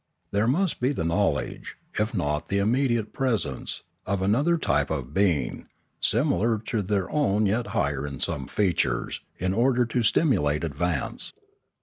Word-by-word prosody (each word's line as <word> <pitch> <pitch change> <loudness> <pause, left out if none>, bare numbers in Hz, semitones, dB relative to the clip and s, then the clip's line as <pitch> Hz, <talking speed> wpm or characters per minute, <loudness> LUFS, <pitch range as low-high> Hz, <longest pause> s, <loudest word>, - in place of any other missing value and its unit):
There 105 +2 +2
must 175 +7 +1
be 130 +3 +1
the 80 - -2
knowledge, 85 -7 -1 0.2
if 110 +3 0
not 75 -3 -1
the 100 - +1
immediate 120 +1 +1
presence, 115 - -1 0.2
of 95 -1 0
another 140 - +3
type - - +1
of 70 +1 -3
being, 85 -9 +1 0.3
similar 115 -2 +2
to 110 +1 -2
their 95 -1 0
own 110 -8 +2
yet 110 +4 +1
higher 70 -1 -1
in 70 -3 -7
some - - -2
features, 90 - 0 0.2
in 95 +1 -1
order 125 +3 +3
to 120 +1 0
stimulate 85 - +2
advance. 80 -1 -1
100 Hz, 145 wpm, -26 LUFS, 80-120 Hz, 0.3 s, another